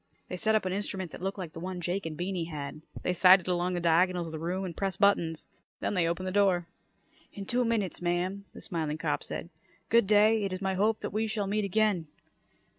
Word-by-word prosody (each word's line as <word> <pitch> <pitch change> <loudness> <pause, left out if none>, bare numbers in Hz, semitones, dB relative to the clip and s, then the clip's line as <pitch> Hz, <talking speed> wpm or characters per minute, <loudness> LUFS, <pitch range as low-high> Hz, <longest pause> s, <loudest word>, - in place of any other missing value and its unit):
They - - -3
set 220 +2 +2
up 215 - +1
an 185 - -1
instrument 190 -3 -3
that - - -9
looked 195 +2 -3
like 175 -4 -6
the - - -7
one 185 +1 -5
Jake 175 +1 -2
and 155 -2 -6
Beany 180 -1 -2
had. 150 -2 -6 0.2
They 180 - +1
sighted 185 0 +6
along 180 0 0
the 175 - -1
diagonals 175 +1 +3
of 165 - -7
the 160 - -5
room 180 +4 -2
and 175 -3 -6
pressed 195 -2 -2
buttons. 170 -5 +2 0.3
Then - - -1
they 180 -4 +2
opened 170 +2 -2
the - - -2
door. 190 -3 +3 0.7
"In 200 - -7
two 245 +4 +1
minutes, 220 -8 -1
ma'am," 180 +3 -1
the - - -11
smiling 155 -3 -3
cop - - -1
said. - - -6 0.4
"Good 230 -3 +4
day. 215 +1 +5
It 195 - -2
is 185 - -3
my 190 0 -1
hope 210 +4 +1
that - - -4
we 220 +1 0
shall 215 -2 -1
meet 205 +1 0
again." 200 -4 +1
185 Hz, 230 wpm, -29 LUFS, 175-200 Hz, 0.7 s, sighted